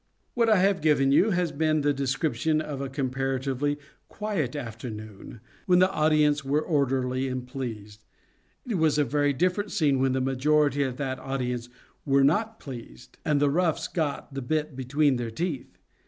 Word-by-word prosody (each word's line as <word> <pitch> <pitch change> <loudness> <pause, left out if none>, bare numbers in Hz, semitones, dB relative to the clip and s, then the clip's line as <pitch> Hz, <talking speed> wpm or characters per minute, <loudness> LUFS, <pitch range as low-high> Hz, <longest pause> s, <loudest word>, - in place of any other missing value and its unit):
What 230 -2 +2
I 215 - +5
have 190 -1 +2
given 145 -3 +3
you 185 +10 +5
has 175 -4 0
been 155 +1 +1
the 145 0 +2
description 140 +3 0
of 145 -3 -4
a 135 - -3
comparatively 135 +1 -1 0.3
quiet 195 - -3
afternoon, 110 -4 -8 0.3
when 180 -1 +5
the 185 +1 +4
audience 150 -2 +2
were 140 +2 +1
orderly 135 -4 0
and 130 -1 -4
pleased. 110 -5 -7 0.6
It 215 -7 -1
was 155 -2 +3
a 150 - +4
very 145 +2 +1
different 185 +8 0
scene 150 -9 +2
when 130 0 +2
the 130 - +1
majority 145 +2 +2
of 130 -3 -1
that 130 -2 -3
audience 125 -3 -3 0.3
were 140 -1 +3
not 220 +10 +1
pleased 65 - -10
and 150 -2 +2
the 145 -1 +3
roughs 165 0 +1
got 150 -3 -3
the 135 - -4
bit 150 +2 -2
between 135 +1 +1
their 120 -1 -3
teeth. 150 +2 -4
140 Hz, 170 wpm, -26 LUFS, 130-155 Hz, 0.6 s, I